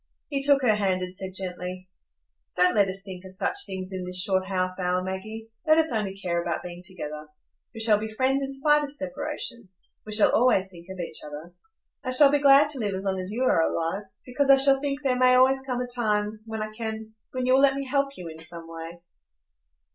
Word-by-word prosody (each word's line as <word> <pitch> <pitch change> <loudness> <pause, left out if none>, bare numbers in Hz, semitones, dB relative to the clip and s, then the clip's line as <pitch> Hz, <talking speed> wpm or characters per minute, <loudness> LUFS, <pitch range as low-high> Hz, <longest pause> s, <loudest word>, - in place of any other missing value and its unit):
He 280 -2 -2
took 280 -1 +3
her 230 -4 +4
hand 190 -3 0
and 180 0 -7
said 190 -1 -7
gently: 185 0 -5 0.7
"Don't 180 0 +3
let 200 -2 +3
us 195 +1 -3
think 190 -2 -9
of 190 0 -10
such 400 - +2
things 190 0 -4
in 185 -1 -4
this 180 0 0
short 190 -1 +1
half 185 -1 -2
hour, 180 0 0
Maggie. 215 +4 -6 0.2
Let 310 0 +5
us 320 -1 +2
only 205 -4 -2
care 170 -3 -2
about 170 -1 -3
being 175 0 -8
together. 155 -5 -7 0.4
We 225 - -6
shall 215 -2 +5
be 220 - -4
friends 260 +5 0
in 275 0 -3
spite 295 +2 +2
of 285 - -5
separation. 285 -6 -5 0.3
We 215 - -9
shall 210 0 +5
always 195 -6 +3
think 170 -1 -14
of 190 -1 -8
each 165 -2 -5
other. 150 +3 -9 0.5
I 255 - -4
shall 275 +2 +7
be 290 - +2
glad 280 +1 +6
to 275 - -1
live 205 -4 -2
as 190 - -5
long 190 -1 -1
as 185 0 -5
you 230 +5 -2
are 255 - +3
alive, 165 +5 -2 0.2
because 275 +2 -1
I 275 - +9
shall 270 0 +6
think 285 0 -3
there 260 -2 +1
may 255 0 +5
always 265 +1 +4
come 255 -2 -3
a - - -2
time 215 -3 -1
when 220 -1 -4
I 215 - -6
can—when 220 +2 -6
you 255 - +3
will 265 - +5
let 275 -1 +4
me 275 0 -4
help 275 +1 -1
you 175 - -8
in 160 0 -10
some 165 0 -6
way." 165 +1 -9
215 Hz, 230 wpm, -25 LUFS, 185-265 Hz, 0.7 s, I